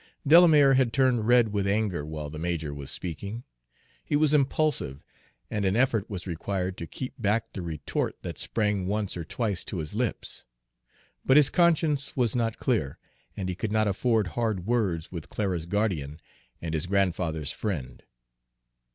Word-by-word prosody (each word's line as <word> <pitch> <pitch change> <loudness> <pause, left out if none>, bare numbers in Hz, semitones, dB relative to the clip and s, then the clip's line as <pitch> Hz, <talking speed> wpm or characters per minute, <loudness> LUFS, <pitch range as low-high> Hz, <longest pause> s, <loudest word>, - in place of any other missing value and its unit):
Delamere 150 -3 +7
had 130 -3 +3
turned 125 -5 +2
red 120 -2 +5
with 100 -1 0
anger 100 -5 0
while 75 -1 -6
the 75 - -7
major 80 -3 -2
was 70 -1 -7
speaking. 100 +7 -5 0.6
He - - -1
was 150 0 +3
impulsive, 140 - +1 0.5
and 105 -2 -1
an 95 0 +2
effort 115 -4 +2
was 95 -4 -5
required 90 +1 -3
to 85 - -5
keep 130 -1 -6
back 115 +1 0
the 95 - -5
retort 80 -3 -3
that - - -6
sprang 105 -4 0
once 105 0 -1
or 85 - -4
twice 100 +1 -2
to 95 - -5
his 75 -2 -4
lips; - - -3 0.8
but 130 - +5
his 150 -2 +6
conscience 160 -5 +2
was 120 -3 +1
not 115 -2 0
clear, 110 - 0 0.4
and 95 - -3
he 90 - -1
could 105 +4 -4
not 110 0 +2
afford 110 0 +1
hard 110 -4 -1
words 100 -9 0
with 85 -4 -7
Clara's 90 -6 -2
guardian 85 -8 -1 0.4
and 80 -1 -4
his 80 +2 0
grandfather's 85 -6 0
friend. 70 - -4
100 Hz, 165 wpm, -27 LUFS, 85-120 Hz, 0.8 s, Delamere